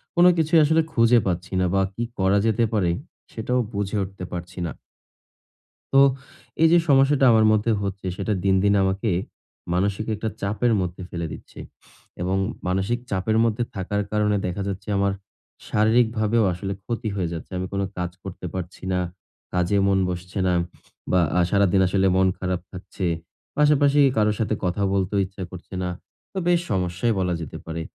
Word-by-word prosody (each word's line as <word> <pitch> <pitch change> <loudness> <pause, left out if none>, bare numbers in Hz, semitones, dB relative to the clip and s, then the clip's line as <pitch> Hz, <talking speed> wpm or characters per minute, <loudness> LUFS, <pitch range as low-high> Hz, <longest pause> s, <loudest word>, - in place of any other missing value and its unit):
কোন 175 0 +6
কিছুই 160 +1 +4
আসলে 160 +2 +4
খুঁজে 115 +1 +5
পাচ্ছি 90 +1 -3
না 90 - +2
বা 95 - +3
কি 115 - -3 0.2
করা 95 +1 +3
যেতে 115 +1 +2
পারে 95 -5 +2 0.4
সেটাও 125 +3 -1
বুঝে 100 +1 -2
উঠতে 95 -1 -8
পারছি 90 +1 -6
না। - - -5 1.2
তো - - +5 0.6
এই 165 - +7
যে - - +7
সমস্যাটা 135 0 +5
আমার 110 -1 +5
মধ্যে 110 +2 +2
হচ্ছে 95 -1 -4
সেটা 105 +1 -1
দিন, 95 -1 +3
দিন 100 0 +4
আমাকে 95 +3 0 0.6
মানসিক 100 +3 0
একটা 110 +2 -3
চাপের 110 +4 +1
মধ্যে 90 0 -4
ফেলে 85 -1 -4
দিচ্ছে - - -12 0.6
এবং 95 +2 0 0.3
মানসিক 95 +6 0
চাপের 100 +3 +1
মধ্যে 115 +1 +1
থাকার 100 +2 -1
কারণে 105 -1 +2
দেখা 90 +2 -3
যাচ্ছে 100 -1 -5
আমার 100 0 +2 0.5
শারীরিকভাবেও 110 0 +2
আসলে 95 +2 -4
ক্ষতি 115 -1 -3
হয়ে 90 -4 -1
যাচ্ছে। 80 - -7
আমি 90 0 -3
কোন 100 - 0 0.2
কাজ 90 0 -2
করতে 95 -1 -8
পারছি 95 -1 -6
না। 90 - +1 0.5
কাজে 90 +2 +1
মন 95 -1 +3
বসছে 90 +2 -5
না 90 - +2 0.6
বা 90 - +4 0.2
আ - - +5
সারাদিন 100 -2 +3
আসলে 95 +1 +2
মন 95 0 +4
খারাপ 90 -1 -2
থাকছে। 95 0 -6 0.5
পাশাপাশি 145 -1 +4 0.2
কারো 105 0 +4
সাথে 110 -1 0
কথা 90 +3 0
বলতেও 100 +1 +1
ইচ্ছা 95 0 -8
করছে 90 +1 -11
না। 90 - -1 0.4
তো - - -7
বেশ 175 -1 +4
সমস্যাই 90 +4 0
বলা 90 -1 0
যেতে 80 - -7
পারে। 80 0 -4
100 Hz, 165 wpm, -23 LUFS, 90-110 Hz, 1.2 s, এই